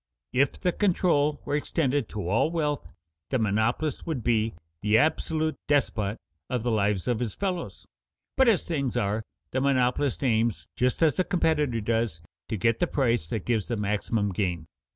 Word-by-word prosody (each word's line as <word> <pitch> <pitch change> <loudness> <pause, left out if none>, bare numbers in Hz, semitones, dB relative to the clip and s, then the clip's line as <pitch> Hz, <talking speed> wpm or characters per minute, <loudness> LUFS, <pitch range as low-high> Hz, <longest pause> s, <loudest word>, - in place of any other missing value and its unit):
If 135 +2 +2
the 180 - +1
control 170 -7 +2
were - - -3
extended 145 -4 0
to 105 -5 -4
all 110 - +2
wealth, 150 -4 -2 0.4
the 130 - +1
monopolist 110 +8 0
would 145 -8 -2
be 110 -3 +1 0.3
the 105 +1 +4
absolute 155 +3 +1
despot 115 -7 +1 0.3
of 125 -3 -1
the 120 - 0
lives 100 -2 +1
of 120 -3 +1
his 115 -5 -3
fellows. 185 -3 -3 0.5
But 265 -1 +4
as 220 -5 +4
things 140 -7 -1
are, 105 +2 0 0.3
the 130 - 0
monopolist 130 0 +1
aims, 115 -3 +1
just 125 +6 +1
as 155 - +3
the 185 - +3
competitor 150 - +1
does, 110 -5 0 0.3
to 110 - -1
get 115 +4 +2
the 175 - +2
price 120 - +1
that 105 +1 -3
gives 115 -4 0
the 120 - -2
maximum 105 0 0
gain. 90 -4 -1
125 Hz, 170 wpm, -27 LUFS, 110-150 Hz, 0.5 s, the